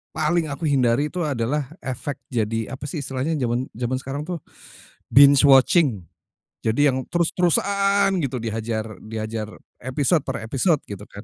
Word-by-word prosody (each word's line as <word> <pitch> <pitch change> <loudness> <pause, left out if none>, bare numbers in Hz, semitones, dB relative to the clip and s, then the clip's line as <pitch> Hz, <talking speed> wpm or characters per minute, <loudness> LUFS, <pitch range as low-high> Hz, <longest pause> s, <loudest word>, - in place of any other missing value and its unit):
paling 160 +1 +1
aku 140 +3 -3
hindari 135 0 +2
itu 180 -1 -2
adalah 135 +1 -2
efek 135 +2 -5
jadi, 115 -2 -1
apa 130 - -13
sih 160 - -4
istilahnya, 135 +4 -2
zaman 125 0 -1
zaman 125 +2 -2
sekarang 140 +2 -4
tuh, 175 -2 -4 0.7
binge 140 0 +8
watching, 135 - +4 0.6
jadi 140 +6 +3
yang 130 0 -3
terus-terusan 195 +3 +2
gitu 135 -1 -2
dihajar 110 -1 -4
dihajar 110 0 -4 0.3
episode 135 +6 +1
per - - -3
episode 145 +6 +1
gitu 100 0 -7
kan. 100 - -10
135 Hz, 145 wpm, -23 LUFS, 115-155 Hz, 0.7 s, binge